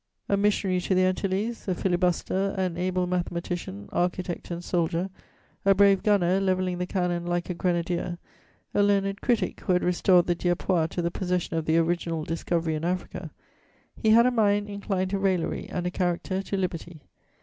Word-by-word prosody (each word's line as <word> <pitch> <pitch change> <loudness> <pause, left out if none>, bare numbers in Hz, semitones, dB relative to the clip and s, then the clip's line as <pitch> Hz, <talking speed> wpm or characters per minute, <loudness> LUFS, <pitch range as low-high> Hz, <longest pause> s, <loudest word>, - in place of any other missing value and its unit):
A 200 - +2
missionary 195 -2 +1
to 185 - 0
the 185 0 +4
Antilles, 195 +5 -1
a 185 - +1
filibuster, 185 +2 0
an 185 -3 -1
able 180 +1 0
mathematician, 175 - -3
architect 175 0 -2
and 170 0 -5
soldier, 175 +2 -1 0.5
a 195 0 +5
brave 195 -1 +5
gunner 195 -3 +3
levelling 185 -2 0
the 180 - -2
cannon 175 -2 -1
like 175 +1 -1
a - - -1
grenadier, 175 0 -1 0.6
a - - +3
learned 200 0 +1
critic, 240 -3 0
who 185 - 0
had 180 - +2
restored 180 0 +4
the 175 - +2
Dieppois 175 -1 +1
to 175 +1 -3
the 170 - 0
possession 180 -2 -2
of 160 -1 -1
their 165 +1 +3
original 165 -1 -1
discovery 165 0 -1
in 155 0 -3
Africa, 180 +2 -3 0.7
he 220 - 0
had 230 +2 +7
a 250 - +4
mind 205 -3 +2
inclined 195 -2 -2
to 200 - 0
raillery 190 -3 0
and 180 -1 -3
a 180 - -1
character 185 +1 -1
to 195 0 -3
liberty. 170 -4 -4
180 Hz, 175 wpm, -26 LUFS, 175-195 Hz, 0.7 s, had